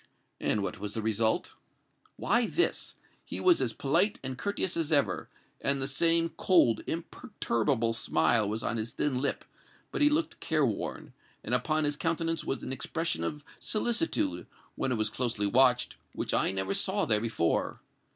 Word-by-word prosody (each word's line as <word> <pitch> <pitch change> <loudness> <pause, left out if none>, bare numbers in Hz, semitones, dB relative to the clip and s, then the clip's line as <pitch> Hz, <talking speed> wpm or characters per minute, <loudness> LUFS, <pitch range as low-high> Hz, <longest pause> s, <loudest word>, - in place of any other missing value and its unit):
"And 105 - +1
what 110 - -4
was 105 0 -5
the 110 - -2
result?" 110 0 +1 0.6
"Why, 235 +4 +1
this. 350 - 0 0.3
He - - -5
was 360 -2 +4
as 115 - +1
polite 165 - +1
and 130 -1 -4
courteous 195 +4 -2
as 165 -2 -1
ever, 145 -2 +1 0.3
and 140 0 +2
the 135 - 0
same 165 +4 +3
cold, 170 -11 +4
imperturbable 125 - -1
smile 110 0 +2
was 110 +2 -3
on 115 - -1
his 110 +1 -4
thin 130 -4 -1
lip; 140 - -2 0.5
but - - -3
he 295 - +6
looked 310 +2 -1
careworn, - - -1 0.3
and - - -3
upon 155 -1 +1
his 145 0 +1
countenance 165 0 -1
was 135 - -3
an 130 - -4
expression 165 +5 -2
of 150 -1 -4
solicitude, 260 +7 0 0.3
when 130 - -2
it - - +1
was 110 0 +1
closely 115 -2 -1
watched, 125 +3 +3 0.2
which - - -3
I - - +2
never 95 0 -2
saw - - +1
there 105 -1 +3
before. 110 -8 -1
135 Hz, 165 wpm, -29 LUFS, 110-165 Hz, 0.6 s, he